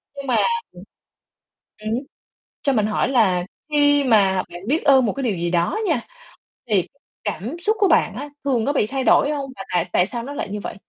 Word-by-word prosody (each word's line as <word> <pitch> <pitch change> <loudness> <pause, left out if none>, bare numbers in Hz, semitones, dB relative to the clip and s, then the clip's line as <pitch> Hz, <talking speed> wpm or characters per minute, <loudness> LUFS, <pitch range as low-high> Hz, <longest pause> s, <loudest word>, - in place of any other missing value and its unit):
Nhưng 280 -1 -7
mà 245 - +2 0.4
ừm, - - -12 1.0
ừm 215 0 -4
hứm, 235 - 0 0.6
cho 280 - +2
mình 215 -5 +2
hỏi 215 - 0
là 200 -9 +2 0.3
khi 290 -1 +4
mà 195 -6 +3
bạn 175 +1 -8
biết 310 +5 +1
ơn 265 -3 +5
một - - 0
cái 275 - -5
điều 210 -6 0
gì 170 0 -2
đó 170 - +1
nha, 305 -8 +1 0.7
thì 195 -5 +1 0.4
cảm 215 - -4
xúc 430 +5 0
của 400 - +5
bạn 315 - +3
á 290 +4 -6
thường 255 -5 +1
có 285 - +2
bị 270 - +1
thay 265 +3 -3
đổi 285 - +4
hông 275 -2 -4
và - - -7
tại 175 -1 +1
tại 180 - +3
sao 235 +1 -5
nó 280 +4 -7
lại 210 - -4
như 210 0 -4
vậy? - - -6
240 Hz, 220 wpm, -21 LUFS, 205-280 Hz, 1.0 s, ơn